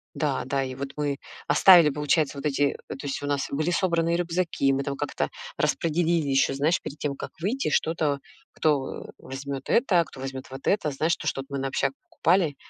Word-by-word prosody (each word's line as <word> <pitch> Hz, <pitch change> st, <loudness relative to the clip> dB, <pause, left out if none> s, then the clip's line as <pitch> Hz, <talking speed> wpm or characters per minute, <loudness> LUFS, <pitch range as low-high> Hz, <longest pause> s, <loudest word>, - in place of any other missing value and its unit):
Да, 145 Hz, -4 st, -1 dB
да, 135 Hz, 0 st, 0 dB
и 130 Hz, -, -5 dB
вот 135 Hz, +1 st, -5 dB
мы 145 Hz, -1 st, -1 dB, 0.3 s
оставили, 165 Hz, +1 st, +7 dB
получается, 150 Hz, 0 st, 0 dB
вот 140 Hz, -, -4 dB
эти 145 Hz, 0 st, +1 dB
э, -, -, -4 dB
то 145 Hz, -, -8 dB
есть 135 Hz, -, -3 dB
у 145 Hz, -, -3 dB
нас 145 Hz, -1 st, 0 dB
были 155 Hz, +5 st, 0 dB
собранные 170 Hz, -2 st, +1 dB
рюкзаки, 170 Hz, -5 st, 0 dB
мы 135 Hz, +1 st, 0 dB
там 140 Hz, -1 st, -3 dB
как-то 145 Hz, -, -2 dB, 0.3 s
распределили 165 Hz, -2 st, +1 dB
ещё, 135 Hz, 0 st, +3 dB
знаешь, 150 Hz, +5 st, +2 dB
перед 145 Hz, -, -8 dB
тем, 145 Hz, -2 st, -2 dB
как -, -, -6 dB
выйти, 220 Hz, -, -1 dB
что-то, 155 Hz, -2 st, +1 dB, 0.3 s
кто, 145 Hz, -4 st, 0 dB
э, -, -, -10 dB
возьмёт 135 Hz, 0 st, -6 dB
это, 185 Hz, -9 st, +3 dB
кто 130 Hz, -, -13 dB
возьмёт 135 Hz, -1 st, -5 dB
вот 135 Hz, +1 st, -9 dB
это, 155 Hz, -7 st, +2 dB
знаешь, 160 Hz, +5 st, +1 dB
то, -, -, -9 dB
что 135 Hz, -, -1 dB
от -, -, -16 dB
мы 140 Hz, -, -3 dB
на 135 Hz, 0 st, -1 dB
общак 135 Hz, 0 st, 0 dB, 0.2 s
покупали, 165 Hz, -4 st, +2 dB
145 Hz, 210 wpm, -26 LUFS, 135-165 Hz, 0.3 s, оставили